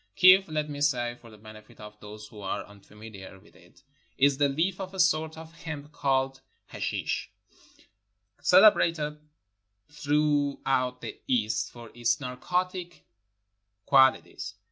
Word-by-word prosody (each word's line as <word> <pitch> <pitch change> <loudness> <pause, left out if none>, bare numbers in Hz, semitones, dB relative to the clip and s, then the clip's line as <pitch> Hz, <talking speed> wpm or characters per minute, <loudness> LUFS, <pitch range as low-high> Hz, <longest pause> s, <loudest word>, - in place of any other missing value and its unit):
Kiff, 185 +1 +7
let 155 -1 -2
me 145 -1 -7
say 120 -5 +1
for 115 - -14
the 110 - -15
benefit 110 0 -15
of 105 0 -11
those 105 +1 -10
who 105 - -13
are 95 - -4
un 105 0 -16
familiar 100 -2 -12
with 105 - -22
it, 90 +8 -21 0.3
is 140 0 +3
the 145 -1 +3
leaf 175 +7 -1
of 190 0 -7
a - - -7
sort 160 -3 +2
of 160 0 -11
hemp 150 -3 -8
called 135 -2 -1 0.3
hashish, - - -3 1.1
celebrated 165 -6 +4 0.7
throughout 145 -4 0
the - - -7
East 110 -4 0
for 120 -2 -12
its 120 0 0
narcotic 175 +7 -3 0.8
quaUties. 130 -7 +3
140 Hz, 135 wpm, -27 LUFS, 115-160 Hz, 1.1 s, Kiff